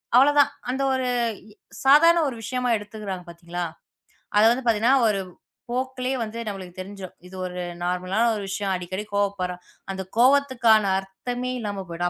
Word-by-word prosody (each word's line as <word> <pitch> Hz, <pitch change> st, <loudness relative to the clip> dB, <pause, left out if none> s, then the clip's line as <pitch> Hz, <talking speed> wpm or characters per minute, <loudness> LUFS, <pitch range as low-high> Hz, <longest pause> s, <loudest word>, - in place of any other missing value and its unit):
அவ்வள 275 Hz, +3 st, +7 dB
தான். 285 Hz, 0 st, +5 dB, 0.2 s
அந்த 265 Hz, +2 st, -1 dB
ஒரு 260 Hz, -1 st, 0 dB, 0.4 s
இ -, -, -17 dB, 0.3 s
சாதாரண 335 Hz, +5 st, +7 dB
ஒரு 265 Hz, -, -3 dB
விஷயமா 250 Hz, +2 st, -2 dB
எடுத்துக்கறாங்க 205 Hz, -3 st, -6 dB
பாத்தீங்களா? 170 Hz, +1 st, -5 dB, 0.7 s
அத 210 Hz, -, +6 dB
வந்து 260 Hz, +2 st, -1 dB
பாத்தீங்கன்னா 230 Hz, +3 st, +3 dB
ஒரு 200 Hz, -2 st, +1 dB, 0.5 s
போக்குலே 255 Hz, +1 st, -2 dB
வந்து 220 Hz, +1 st, -6 dB
நமக்குத் 185 Hz, -3 st, -7 dB
தெரிஞ்சுரும். 190 Hz, -1 st, -9 dB
"இது 185 Hz, -, -12 dB
ஒரு 180 Hz, 0 st, -5 dB, 0.2 s
நார்மலான 185 Hz, +5 st, 0 dB, 0.2 s
விஷயம். 195 Hz, 0 st, -2 dB
அடிக்கடி 185 Hz, +3 st, -4 dB
கோபப்படுறா" 195 Hz, -3 st, 0 dB, 0.4 s
அந்தக் 190 Hz, -1 st, -6 dB
கோபத்துக்கான 255 Hz, -4 st, +5 dB, 0.2 s
அர்த்தமே 245 Hz, +6 st, -5 dB
இல்லாம 205 Hz, -3 st, -4 dB
போயிடும். 175 Hz, +1 st, -1 dB
210 Hz, 145 wpm, -24 LUFS, 185-250 Hz, 0.7 s, அவ்வள